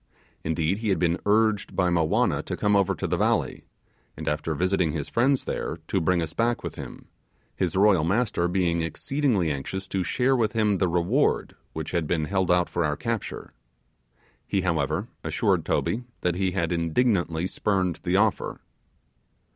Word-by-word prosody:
Indeed, 80 Hz, +4 st, 0 dB
he 110 Hz, -2 st, -2 dB
had 95 Hz, -, +2 dB
been 85 Hz, 0 st, +1 dB
urged 110 Hz, -1 st, +2 dB
by 90 Hz, -2 st, +2 dB
Mowanna 85 Hz, -2 st, +2 dB
to -, -, -4 dB
come 105 Hz, 0 st, +2 dB
over 100 Hz, -2 st, +2 dB
to -, -, -4 dB
the -, -, 0 dB
valley, -, -, 0 dB, 0.5 s
and -, -, -7 dB
after 75 Hz, +1 st, -1 dB
visiting 90 Hz, -1 st, +1 dB
his 75 Hz, -3 st, -3 dB
friends 130 Hz, +3 st, +2 dB
there, -, -, -3 dB
to -, -, +1 dB
bring 85 Hz, +1 st, +2 dB
us 80 Hz, -1 st, -6 dB
back 120 Hz, +1 st, 0 dB
with -, -, -4 dB
him, -, -, -9 dB, 0.5 s
his 90 Hz, 0 st, -1 dB
royal 95 Hz, -4 st, +4 dB
master 100 Hz, -1 st, +1 dB
being 90 Hz, -2 st, +1 dB
exceedingly 100 Hz, -, 0 dB
anxious 95 Hz, +8 st, -4 dB
to 95 Hz, -, -1 dB
share 130 Hz, +7 st, +1 dB
with 110 Hz, -4 st, +1 dB
him 105 Hz, -4 st, +2 dB
the 95 Hz, -, +2 dB
reward 90 Hz, -, +1 dB, 0.2 s
which 80 Hz, -1 st, -5 dB
had 85 Hz, -3 st, -1 dB
been 80 Hz, -2 st, 0 dB
held 95 Hz, +1 st, 0 dB
out 90 Hz, -1 st, +3 dB
for 85 Hz, -, -1 dB
our 75 Hz, -2 st, 0 dB
capture. 115 Hz, +2 st, -4 dB, 0.9 s
He, 100 Hz, -, 0 dB
however, 85 Hz, -3 st, 0 dB, 0.2 s
assured -, -, +1 dB
Toby 120 Hz, +3 st, -1 dB, 0.2 s
that 90 Hz, -, +1 dB
he 95 Hz, +2 st, 0 dB
had 85 Hz, -3 st, -1 dB
indignantly 85 Hz, 0 st, +1 dB
spurned 95 Hz, -2 st, -1 dB
the -, -, 0 dB
offer. -, -, +1 dB
90 Hz, 170 wpm, -26 LUFS, 85-105 Hz, 0.9 s, royal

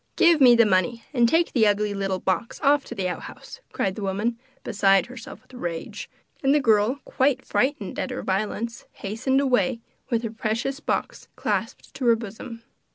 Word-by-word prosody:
'Give 335 Hz, -3 st, +5 dB
me 245 Hz, -2 st, +8 dB
the 230 Hz, -1 st, +6 dB
money, 215 Hz, +4 st, +1 dB
and 240 Hz, -3 st, +4 dB
take 335 Hz, +4 st, +2 dB
the 225 Hz, -4 st, +4 dB
ugly 205 Hz, 0 st, +1 dB
little 195 Hz, -1 st, -1 dB
box 190 Hz, +5 st, -2 dB
off 285 Hz, 0 st, +4 dB
to 240 Hz, -, -8 dB
the 190 Hz, -3 st, -1 dB
outhouse,' 180 Hz, -, -8 dB
cried 190 Hz, -, -1 dB
the 210 Hz, -, -7 dB
woman, 210 Hz, +4 st, -1 dB, 0.2 s
beside 195 Hz, -3 st, +3 dB
herself 250 Hz, +3 st, -11 dB
with -, -, -23 dB
rage, 170 Hz, -9 st, -5 dB, 0.3 s
and 275 Hz, +1 st, +3 dB
the -, -, +4 dB
girl, 225 Hz, +1 st, +2 dB
quite 265 Hz, 0 st, +1 dB
frightened 260 Hz, -2 st, -1 dB
at 285 Hz, -, -2 dB
her 250 Hz, -, -5 dB
violence, 215 Hz, +4 st, -2 dB
hastened 225 Hz, +7 st, -1 dB
away, 260 Hz, -2 st, +1 dB, 0.3 s
with 235 Hz, -1 st, 0 dB
her 225 Hz, -, -3 dB
precious 230 Hz, +5 st, -2 dB
box -, -, -3 dB
clasped -, -, -3 dB
to 265 Hz, -3 st, -2 dB
her 230 Hz, -, +6 dB
bosom. 230 Hz, +2 st, -8 dB
230 Hz, 180 wpm, -24 LUFS, 205-260 Hz, 0.3 s, me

